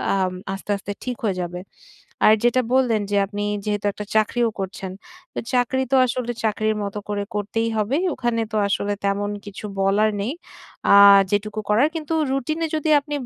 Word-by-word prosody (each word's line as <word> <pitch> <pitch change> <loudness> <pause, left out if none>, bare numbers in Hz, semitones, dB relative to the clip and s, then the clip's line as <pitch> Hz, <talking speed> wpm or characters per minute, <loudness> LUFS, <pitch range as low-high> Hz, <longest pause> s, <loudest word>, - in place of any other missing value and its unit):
আম 185 -1 0 0.2
আস্তে, 195 +2 -5
আস্তে 195 +1 -7
ঠিক 250 -1 -3
হয়ে 200 -4 0
যাবে। 180 +1 -6 0.6
আর 215 - +8
যেটা 240 +1 +3
বললেন 245 -5 +3
যে, 205 - +2
আপনি 205 +1 -4 0.2
যেহেতু 205 -1 -2
একটা 210 - -7
চাকরিও 230 +2 +2
করছেন। 190 0 -5 0.4
তো - - -3
চাকরি 255 +1 +2
তো - - +4
আসলে 245 -1 -2
চাকরির 215 0 0
মতো 200 +1 -4
করে 205 -1 -1
করতেই 225 +2 -1
হবে। 215 +6 +1 0.2
ওখানে 240 -2 -1
তো - - +1
আসলে 200 +1 -1
তেমন 200 +1 0
কিছু 205 +1 -8 0.2
বলার 200 +3 +3
নেই। 230 +7 -2 0.6
আ - - +9 0.4
যেটুকু 210 +1 -1
করার 235 +8 +4
কিন্তু 320 0 -3 0.2
রুটিনে 310 +5 -1
যদি 310 0 -1
আপনি 290 +1 -5
215 Hz, 170 wpm, -22 LUFS, 205-245 Hz, 0.6 s, আ